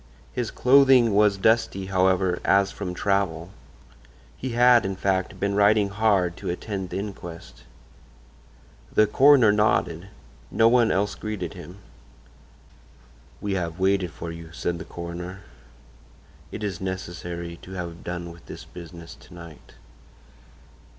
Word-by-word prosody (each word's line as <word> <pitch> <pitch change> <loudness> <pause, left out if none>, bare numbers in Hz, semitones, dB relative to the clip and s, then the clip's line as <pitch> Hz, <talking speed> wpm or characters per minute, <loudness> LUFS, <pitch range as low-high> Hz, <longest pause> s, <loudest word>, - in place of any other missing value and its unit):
His 125 -3 -2
clothing 130 -3 +5
was 105 -1 +4
dusty, 100 -2 +1
however, 95 -1 +1
as 100 0 +3
from 90 -3 -6
travel. 95 -4 -1 0.8
He 125 - -5
had, 120 0 +5
in 95 0 -3
fact, 95 -1 -1
been 100 0 0
riding 105 0 +3
hard 100 -4 +1
to - - -5
attend 95 +1 -4
the - - -4
inquest. 95 -4 -8 1.3
The 110 - +4
coroner 130 0 +5
nodded; 95 -4 +1 0.4
no 115 - +4
one 120 -1 +4
else 100 +2 0
greeted 105 -5 -5
him. 90 0 -11 1.6
"We 100 -1 -2
have 85 -3 -3
waited 95 -1 +1
for 85 +2 -7
you," 85 -1 -10
said 85 +1 -3
the - - -7
coroner. 85 +2 -7 1.1
"It 105 - -6
is 95 -4 -4
necessary 85 -2 -5
to 95 - -11
have 85 -2 -6
done 85 -1 -5
with 85 0 -16
this - - -9
business 85 -2 -11
to 70 +5 -16
night." 85 -3 -13
95 Hz, 130 wpm, -24 LUFS, 85-105 Hz, 1.6 s, clothing